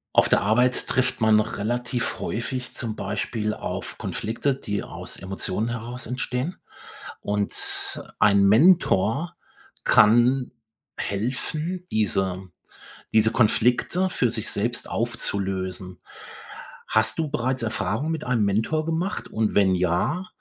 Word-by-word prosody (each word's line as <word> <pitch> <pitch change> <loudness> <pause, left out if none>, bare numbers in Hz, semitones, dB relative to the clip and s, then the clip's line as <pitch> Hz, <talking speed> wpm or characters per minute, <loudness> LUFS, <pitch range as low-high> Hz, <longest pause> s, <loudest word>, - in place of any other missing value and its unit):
Auf - - +5
der - - +4
Arbeit 125 +4 +2
trifft 130 - 0
man 110 -1 +5
relativ 120 +3 -2
häufig 125 +2 -3
zum 115 -3 -4
Beispiel 105 +2 -2
auf - - -5
Konflikte, 125 +5 -2
die 105 -6 -3
aus - - -7
Emotionen 95 +3 -3
heraus 120 +1 -5
entstehen. 125 +6 -3 0.6
Und 105 0 +1 0.2
ein 100 -1 +5
Mentor 140 - +4 0.5
kann 120 +4 +4 0.4
helfen, 150 - -3
diese 95 -3 0 0.7
diese 110 0 +4
Konflikte 125 - +2
für 125 -9 +1
sich 110 -2 -3
selbst 120 +4 -2
aufzulösen. 95 -5 -3 0.9
Hast 110 +7 +1
du 155 -2 -2
bereits 130 -2 -1
Erfahrung 115 +5 -1
mit 160 -2 -3
einem 120 -4 +1
Mentor 110 +11 0
gemacht 165 +5 -2
und 110 -1 -1
wenn 95 -2 +4
ja, 90 - 0
115 Hz, 115 wpm, -24 LUFS, 105-130 Hz, 0.9 s, Auf